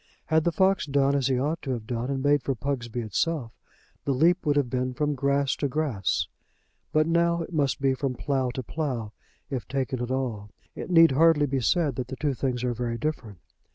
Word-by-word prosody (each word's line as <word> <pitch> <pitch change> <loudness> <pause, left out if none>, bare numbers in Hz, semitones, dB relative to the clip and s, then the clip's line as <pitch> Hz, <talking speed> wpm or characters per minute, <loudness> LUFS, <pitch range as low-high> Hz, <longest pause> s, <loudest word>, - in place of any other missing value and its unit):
Had 160 0 +2
the 170 - +3
fox 190 -1 +2
done 140 0 +2
as 140 -2 +1
he 130 -2 +1
ought 150 +5 -1
to 135 - -6
have 115 -3 -5
done, 120 +2 -3
and 135 -1 -2
made 145 0 +3
for 135 +1 -2
Pugsby 120 -2 -3
itself, 120 - -1 0.5
the 140 - 0
leap 170 +7 +3
would 145 - +3
have 145 -3 +2
been 125 +1 -2
from 150 +1 0
grass 140 0 +1
to 145 - 0
grass; 130 -8 -1 0.6
but 155 0 +3
now 170 +1 +2
it 175 - -10
must 145 -4 +1
be 135 -1 +2
from 130 -1 -2
plough 135 -1 -1
to 130 - -3
plough, 125 -7 -3 0.4
if 130 -3 -3
taken 130 -2 -2
at 120 - -3
all. 120 -6 -2 0.2
It - - -7
need 165 -3 +7
hardly 150 +1 +4
be 135 -1 -1
said 145 +1 +1
that 125 -2 -3
the 130 - -6
two 145 0 -1
things 125 -1 -2
are 125 -1 0
very 120 0 -3
different. 115 - -4
135 Hz, 215 wpm, -26 LUFS, 125-150 Hz, 0.6 s, need